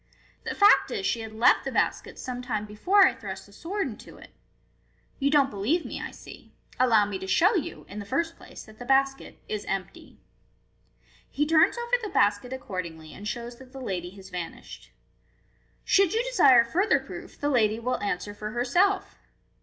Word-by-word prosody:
The - - -3
fact 405 - +5
is, 410 -4 -3
she 235 - 0
had 220 -1 -7
left 220 +3 +4
the - - -4
basket - - -1
some 250 -1 -5
time 215 -4 -3
before 365 - +4
I - - +3
thrust 195 -1 -8
the 200 - -19
sword 365 - -3
into 220 - -10
it. - - -15 0.9
You 280 0 +2
don't 280 -2 +3
believe 230 - 0
me, - - -6
I - - -5
see. - - -14 0.2
Allow 230 -5 +5
me 200 -2 -4
to 190 - -7
show 355 - +4
you, 355 -8 -3
in 205 - -8
the 205 - -7
first 325 +9 -1
place, - - -12
that 215 0 -17
the - - -6
basket 270 +1 +1
is 210 -1 -4
empty." 195 -1 -5 1.1
He 295 - 0
turns 325 +7 +4
over 475 +1 +1
the 430 - -4
basket 205 - +1
accord 195 -9 -4
ingly, 160 -2 -11
and 205 - -8
shows 235 +2 -5
that 260 0 -15
the 270 - -8
lady 185 -8 -4
has 190 -1 -13
vanished. 175 -2 -7
u - - -28 0.9
Should 390 -3 +3
you 460 - +2
desire 270 - +5
further 380 - +2
proof, - - -10
the 290 - 0
lady 220 -5 +2
will 250 +2 -2
answer 205 0 -3
for 210 +1 -6
herself." 360 +12 +1
245 Hz, 195 wpm, -26 LUFS, 205-325 Hz, 1.1 s, fact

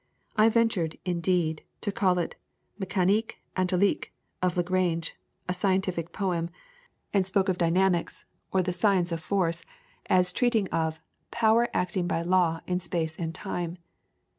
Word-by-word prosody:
I 220 0 +6
ventured, 225 -8 +1
indeed, 170 -3 0 0.2
to 205 - -1
call 195 -4 +2
it 175 - -1 0.5
the 190 - -3
'Mecanique 195 +4 +1 0.2
Analytique' 185 +1 +1 0.3
of 180 -1 +1
Lagrange, 175 -2 0 0.3
'a 180 - 0
scientific 185 -2 0
poem'; 175 -4 -1 0.6
and 200 -2 +4
spoke 190 +1 +1
of 180 - 0
Dynamics, 175 +1 +1 0.3
or 190 -1 +2
the 180 0 -1
Science 180 -1 +2
of 165 - -1
Force, 170 -1 0 0.4
as 180 -1 +3
treating 230 -4 +2
of 160 -1 -1 0.3
'Power 230 +1 +3
acting 180 0 0
by 165 -1 0
Law 175 -2 +2
in 180 0 0
Space 165 -2 -1
and 165 -1 -3
Time.' 175 -3 -4
180 Hz, 140 wpm, -27 LUFS, 170-195 Hz, 0.6 s, I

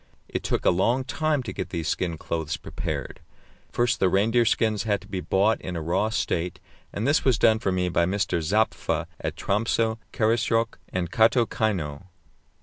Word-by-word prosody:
It - - -3
took - - -2
a - - +6
long 115 +9 +2
time 145 +1 0
to 100 -6 -6
get - - -4
these 85 -3 -3
skin 85 -3 -1
clothes 80 -1 -3
prepared. - - -5 0.5
First 120 0 +1
the 95 - +3
reindeer 115 +5 +3
skins 110 -2 +1
had 105 -2 0
to - - -15
be 95 -2 -4
bought 100 +5 +2
in 90 - -5
a 85 - -3
raw 95 +6 +1
state, 90 -5 -2 0.3
and 110 +5 -2
this 145 - +3
was 130 -4 +3
done 110 -2 +4
for 100 -4 0
me 90 0 0
by 85 -1 +2
Mr. 95 -3 0
Zappfe 105 +7 0
at - - -3
Tromsö, 110 +2 0
Karasjok, 115 0 +1
and 90 -2 -3
Kaatokeino. 110 - +1
105 Hz, 175 wpm, -25 LUFS, 90-115 Hz, 0.5 s, a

